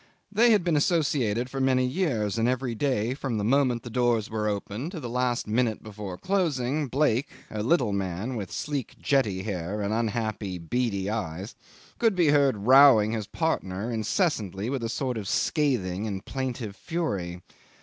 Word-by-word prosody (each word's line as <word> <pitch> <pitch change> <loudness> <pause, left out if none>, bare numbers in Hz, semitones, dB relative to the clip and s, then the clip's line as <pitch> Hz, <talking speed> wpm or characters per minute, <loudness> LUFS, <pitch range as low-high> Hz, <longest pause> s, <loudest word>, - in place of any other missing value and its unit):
They 230 +4 +5
had 210 -5 +4
been 170 -2 +1
associated 140 - +1
for 135 +1 -4
many 130 -1 +3
years, 125 - 0
and 115 +2 +2
every 130 -1 -1
day 120 -2 0
from 135 -4 -3
the 105 - -1
moment 125 0 +2
the 120 - -8
doors 120 -3 +1
were 110 -1 -1
opened 105 - -3
to 170 - -5
the 125 - -5
last 125 0 0
minute 110 0 0
before 105 -4 -7
closing, 150 - 0
Blake, 135 0 +1 0.2
a 105 - -3
little 120 -3 +2
man 100 +5 -2
with 100 -6 -5
sleek, 145 -5 -3
jetty 105 -10 +1
hair 95 0 -3
and 100 +1 -1
unhappy, 110 -4 -2
beady 100 +3 -1
eyes, 100 -2 -4 0.5
could 225 -4 +3
be 175 -4 +3
heard 140 -8 +3
rowing 130 -5 +7
his 110 -3 -3
partner 110 - -2
incessantly 110 - -1
with 135 -4 -2
a 115 - -1
sort 125 -1 -2
of 100 - -6
scathing 110 - 0
and 100 0 -5
plaintive 125 -6 -4
fury. 100 - -3
120 Hz, 170 wpm, -27 LUFS, 105-140 Hz, 0.5 s, rowing